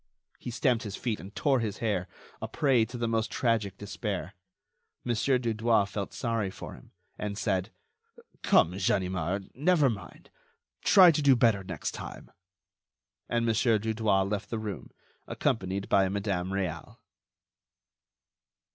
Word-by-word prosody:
He - - -6
stamped 120 -1 +1
his 100 -3 -5
feet 115 -4 -2
and 100 +2 -11
tore 135 -3 +2
his 110 -3 -3
hair—a 100 -6 -4
prey 130 -6 +2
to 120 +3 -8
the 120 -1 -1
most 115 -1 0
tragic 110 -5 0
despair. 100 -3 -4 0.7
Mon. 120 - 0
Dudouis 115 -3 +2
felt 100 -2 -4
sorry 115 -5 -1
for - - -9
him, - - -15 0.3
and 105 -1 -3
said: 95 -4 -1 0.7
"Come, 90 +4 +3
Ganimard, 95 0 -1
never 150 -1 +3
mind; 105 - -10 0.5
try 185 -4 +8
to 155 - -1
do 140 -2 +6
better 115 -5 +3
next 85 -5 -4
time." - - -9 1.0
And 115 0 +1
Mon. 115 - +2
Dudouis 110 -3 +2
left 105 0 -3
the 115 - -2
room, 105 -3 -6 0.4
accompanied 100 -8 -1
by 95 -1 +3
Madame 95 -2 -2
Réal. 95 -5 -4
110 Hz, 135 wpm, -29 LUFS, 95-120 Hz, 1.0 s, try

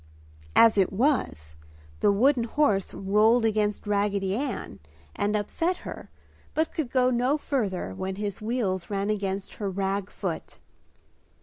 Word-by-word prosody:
As 225 -3 +6
it 190 - +3
was, 190 - 0 0.4
the - - +4
wooden 240 +4 +3
horse 220 -7 +1
rolled 215 +4 +3
against 210 -1 0
Raggedy 200 -1 0
Ann 280 +6 -4 0.4
and 205 +1 0
upset 330 - 0
her - - -8 0.5
but 315 +1 0
could 305 -6 -2
go 255 0 +3
no 250 +4 +2
further 205 - -2
when 190 - -4
his 205 0 -4
wheels 215 -6 -1
ran 200 0 -1
against 195 -2 -3
her 205 -2 -2
rag 195 +1 -2
foot. - - -5
210 Hz, 135 wpm, -27 LUFS, 195-245 Hz, 0.5 s, As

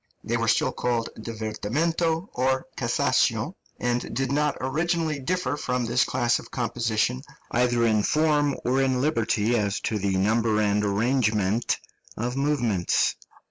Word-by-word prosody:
They - - -1
were - - 0
still - - +2
called 120 -2 -1
divertimento 145 - -2
or 130 +1 0
cassation, 125 - +1 0.3
and 120 -1 -1
did 135 +1 -1
not 150 0 +1
originally 160 +3 -1
differ 145 -1 -1
from 125 -4 -2
this 120 +2 +2
class 120 -2 +1
of - - -12
composition, 120 0 -1 0.3
either 120 -1 +2
in 110 -2 +3
form 150 +1 +2
or 130 +2 +2
in 130 -1 +1
liberty 120 -5 +1
as 105 -3 0
to 110 - -1
the 95 -1 0
number 110 +2 +2
and 105 0 +2
arrangement 105 0 +1 0.4
of 120 +3 -2
movements. 120 -10 +1
120 Hz, 140 wpm, -25 LUFS, 110-140 Hz, 0.4 s, in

